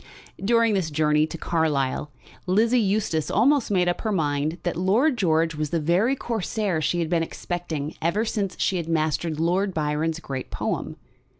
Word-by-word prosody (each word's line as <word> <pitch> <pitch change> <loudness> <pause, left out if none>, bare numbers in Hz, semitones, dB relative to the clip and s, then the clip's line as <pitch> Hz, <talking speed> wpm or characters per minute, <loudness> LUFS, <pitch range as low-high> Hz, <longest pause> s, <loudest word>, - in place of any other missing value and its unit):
During 230 +1 +3
this 185 -5 0
journey 150 0 +2
to 165 - -7
Carlisle 150 -4 0 0.4
Lizzie 225 +6 +3
Eustace 195 -6 0
almost 265 +5 +3
made 180 -3 +2
up 175 - 0
her 220 - -1
mind 150 -2 0
that 175 - -1
Lord 215 - +2
George 165 -5 +2
was 150 -1 -3
the 165 - 0
very 180 - +2
Corsair 210 -7 -2
she 175 - 0
had 165 - -1
been 170 0 +1
expecting 165 -3 -4
ever 185 +7 +1
since 200 -4 -2
she 190 - +1
had 170 -2 -4
mastered 155 0 0
Lord 180 +3 +1
Byron's 155 +1 -1
great 135 -5 -6
poem. - - -3
170 Hz, 170 wpm, -24 LUFS, 155-205 Hz, 0.4 s, During